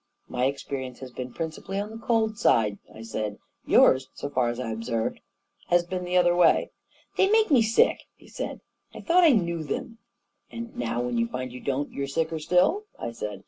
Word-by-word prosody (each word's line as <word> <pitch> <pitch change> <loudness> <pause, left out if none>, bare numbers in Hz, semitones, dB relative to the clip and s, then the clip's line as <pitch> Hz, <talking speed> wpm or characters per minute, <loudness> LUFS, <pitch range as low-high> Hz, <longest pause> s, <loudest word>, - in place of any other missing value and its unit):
" - - -47
My 125 - +2
experience 130 -2 -3
has 130 -1 -8
been 125 +1 -6
principally 165 +6 -4
on 205 +1 -4
the 225 - -8
cold 225 -2 +1
side," 105 - +3
I 110 - -10
said. 110 -2 -4
" - - -44
Yours, 130 0 +6
so 145 - -5
far 125 -3 +1
as 120 +1 -4
I 125 -3 -3
have 110 - -3
observed 115 0 -2
it, - - -28 0.4
has 175 0 +4
been 180 +1 -4
the 180 +1 +1
other 175 -1 +4
way." 175 - +4 0.2
" - - -31
They 385 - +4
make 440 -3 +3
me 260 -5 +6
sick! 225 +1 +3
" - - -52
he - - -19
said. - - -6 0.3
u - - -7
I - - -17
thought 360 +1 +4
I 335 - +8
knew 170 - +1
them! 225 +9 -5
" - - -52
" - - -43
And 235 0 -7
now 120 0 -2
when 120 -1 -1
you 115 - +1
find 125 +1 -5
you 125 - -7
don't, 140 +2 -2
you're 140 0 -3
sicker 160 +3 -1
still!" 180 - +2
I 115 - -4
said. 105 -3 -6
145 Hz, 240 wpm, -26 LUFS, 120-205 Hz, 0.4 s, I